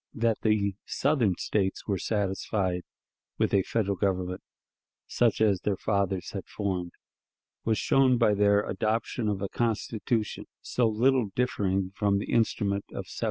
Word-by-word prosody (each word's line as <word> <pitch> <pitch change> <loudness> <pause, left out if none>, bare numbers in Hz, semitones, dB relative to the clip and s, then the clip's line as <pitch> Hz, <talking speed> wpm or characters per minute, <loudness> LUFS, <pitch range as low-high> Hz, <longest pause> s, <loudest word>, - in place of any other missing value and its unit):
That 115 -1 +1
the 105 -2 +2
Southern 130 -10 +1
States 95 -3 -1
were 100 -3 0
satisfied 95 -3 -1 0.6
with - - +1
a 100 - +5
Federal 100 0 -1
Government 90 -1 -1 0.6
such 120 -3 +1
as 100 -4 +3
their 100 -2 0
fathers 100 -3 -1
had - - -6
formed, 90 -4 -3 0.7
was 110 -1 +2
shown 130 -2 +3
by 115 -3 +4
their 100 0 +3
adoption 110 +1 -1
of 100 -1 -2
a 100 - -2
Constitution 115 -1 -1
so 120 -2 0
little 120 +1 +2
differing 95 -6 0
from 100 0 +1
the 100 - -4
instrument 100 -3 +1
of - - -6
1787. - - -7
105 Hz, 145 wpm, -28 LUFS, 95-115 Hz, 0.7 s, a